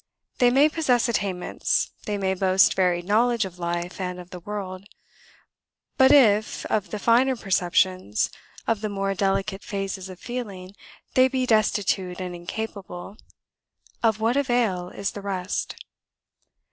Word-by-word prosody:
They 245 - +6
may 275 +4 +5
possess 285 -7 +1
attainments, 200 -6 -1 0.2
they 205 -1 -1
may 190 -1 0
boast 190 0 +4
varied 175 -2 +1
knowledge 230 +2 +2
of 180 -1 -9
life 175 +2 -3
and 180 -1 -4
of 180 0 -11
the 180 - -7
world; 190 0 -6 1.1
but 265 0 +6
if 220 -7 +4
of 210 -2 0
the 210 - -4
finer 245 +5 +3
perceptions, 185 - +1 0.3
of 225 -2 0
the 215 - -2
more 195 -1 -1
delicate 195 0 -1
phases 195 -2 -4
of 185 -1 -10
feeling, 205 -7 -6 0.4
they 255 0 +6
be 260 -1 -1
destitute 200 -5 +1
and 180 -1 -4
incapable, 190 0 -6 0.9
of 220 -2 +2
what 225 +3 +1
avail 240 -10 +1
is 200 +1 -3
the 205 - -8
rest? 190 -1 -3
200 Hz, 140 wpm, -25 LUFS, 185-230 Hz, 1.1 s, They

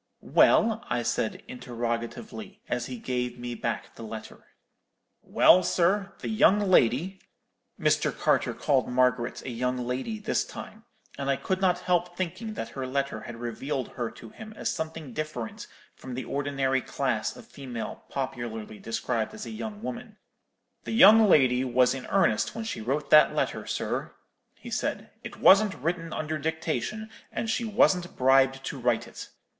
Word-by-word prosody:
"'Well?' 225 +1 +4
I 120 -1 0
said, 110 - -2
interrogatively, 125 - -5
as 125 0 -2
he 125 - -6
gave 125 0 -3
me 120 0 -5
back 115 -1 -4
the - - -12
letter. 110 -1 -9 0.7
"'Well, 185 - +5
sir, 190 +3 +1
the - - -4
young 215 -2 +4
lady,'—Mr. 185 - 0
Carter - - +1
called 135 -3 +1
Margaret 125 -1 +1
a 130 - -5
young 125 +2 -1
lady 130 - -3
this 215 0 0
time, 220 +1 -10 0.3
and 140 0 -2
I 140 - +3
could 190 +6 -2
not 180 -2 +2
help 175 -1 0
thinking 215 +5 -4
that 115 - -4
her 135 -1 -5
letter 135 -4 -2
had 120 - -8
revealed 120 +3 -4
her 120 -2 -4
to 115 - -12
him 220 0 -10
as - - -1
something 160 -4 -5
different 150 -6 -5 0.3
from 130 -2 -8
the 130 - -4
ordinary 135 -2 0
class - - -2
of - - -12
female 125 -5 -7
popularly 120 -5 -5
described 115 - -2
as 215 - -7
a - - -7
young 215 -1 -6
woman,—'the 235 -3 -10
young 220 -1 +8
lady 130 -5 +5
was 125 -1 +3
in 135 -1 -7
earnest 195 0 +2
when 225 - -4
she 220 - -4
wrote 140 +5 -2
that 155 - +7
letter, - - -1
sir,' - - -3 0.4
he - - -11
said; - - -2
'it - - -8
wasn't 200 0 +6
written 165 +3 -3
under 155 0 -3
dictation, 160 - -2 0.2
and 225 - -2
she 235 - -1
wasn't 185 -4 +2
bribed 135 +1 +4
to 135 - -5
write 120 -2 +1
it. - - -10
140 Hz, 160 wpm, -27 LUFS, 125-190 Hz, 0.7 s, young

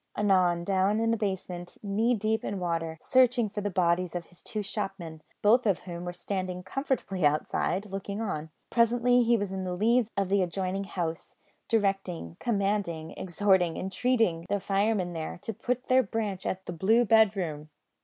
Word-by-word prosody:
Anon, 185 -4 +3
down 195 +3 +2
in 225 0 +2
the - - +3
basement, 185 -4 -4
knee 220 +4 +1
deep 220 +1 0
in 200 - -3
water, 165 -2 -2
searching 250 -3 +3
for 210 - -3
the 205 - -1
bodies 180 -1 +1
of 175 -1 -3
his 175 - -19
two 215 -3 -4
shopmen, 195 -6 -5 0.2
both 230 +3 +5
of 195 -4 +3
whom 175 -1 -7
were 175 - -3
standing 180 0 -4
comfortably 195 - -2
outside, 150 +6 +1
looking 200 +1 -5
on. 160 -8 -3 0.2
Presently 245 +1 +4
he 235 0 +3
was 200 -2 -3
on 190 -1 -3
the 180 -1 -3
leads 230 +4 +2
of 195 -2 0
the 200 0 +3
adjoining 185 +2 -2
house, 165 -4 -4 0.3
directing, 195 - -1
commanding, 195 -7 -1
exhorting, 185 -2 +1
entreating, 190 -3 0
the 205 0 +1
firemen 195 -1 0
there 160 -1 -5
to 225 - -4
point 250 +4 -3
their 255 +1 +5
branch 205 -4 -3
at 190 0 -3
the 175 - -5
"blue 220 +8 +3
bedroom." 190 -9 +2
195 Hz, 170 wpm, -28 LUFS, 175-220 Hz, 0.3 s, both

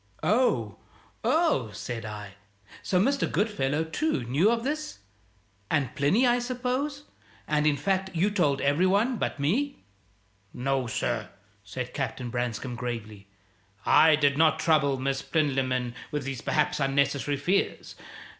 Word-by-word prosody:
"Oh, 245 +4 +1 0.5
oh!" 315 - +2
said 110 +2 -5
I. 105 -2 -7 0.5
"So 180 - +1
Mr. 275 +8 +1
Goodfellow, 160 -9 0
too, 160 - -1
knew 140 - +2
of 230 0 0
this? 305 +3 -3 0.7
And 145 -4 0
Plinny, 185 - +3
I 245 0 +3
suppose? 255 +4 -2 0.4
And, 150 0 +2
in 145 -1 +2
fact, 190 +5 0
you 190 +6 +2
told 150 -9 +1
every 145 +6 +3
one 220 +6 +2
but 155 - -3
me?" 245 - -1 0.7
"No, 135 0 -1
sir," 115 -1 -2 0.3
said 120 +5 -6
Captain 130 -3 -3
Branscome, 120 +1 -3
gravely; 110 -4 -6 0.6
"I 160 -1 +6
did 145 -1 +2
not 160 -1 +4
trouble 150 -4 +2
Miss 135 +1 -1
Plinlimmon 135 -4 0 0.2
with 150 -1 -3
these 135 -3 -5
perhaps 150 0 0
unnecessary 140 +1 +1
fears. 180 +8 -1
145 Hz, 135 wpm, -27 LUFS, 130-200 Hz, 0.7 s, I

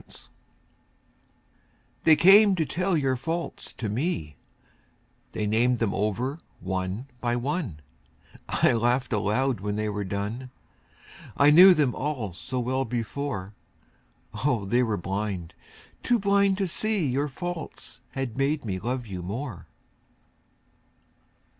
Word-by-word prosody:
Faults - - -13 1.8
They 160 - +8
came 195 +4 +7
to 165 -3 0
tell 180 +2 0
your 135 -3 +1
faults 165 +7 -4
to 115 - -4
me, 105 - -2 1.0
They 105 - -2
named 120 +4 +2
them 115 -4 0
over 115 - -1 0.2
one 95 +5 -3
by 120 -1 0
one; 125 - -3 0.7
I - - +3
laughed 120 +3 +1
aloud 110 +4 +1
when 105 +1 -3
they 105 0 -1
were 105 0 -3
done, 105 +6 -4 0.9
I 145 +1 +6
knew 180 +4 +9
them 140 -6 +2
all 130 -9 -3
so 105 +9 -4
well 130 +2 0
before, 120 -3 -4 0.9
Oh, 125 -8 +1
they 120 +6 +2
were 110 -4 0
blind, 95 -2 -4 0.5
too 245 - +2
blind 200 -2 +2
to 195 -2 0
see 210 0 0
Your 140 +2 0
faults 175 +3 -6
had 135 -2 -4
made 140 0 0
me 95 -3 -2
love 125 +4 -3
you 95 -4 -6
more. 105 +3 -6
125 Hz, 130 wpm, -26 LUFS, 105-150 Hz, 1.8 s, knew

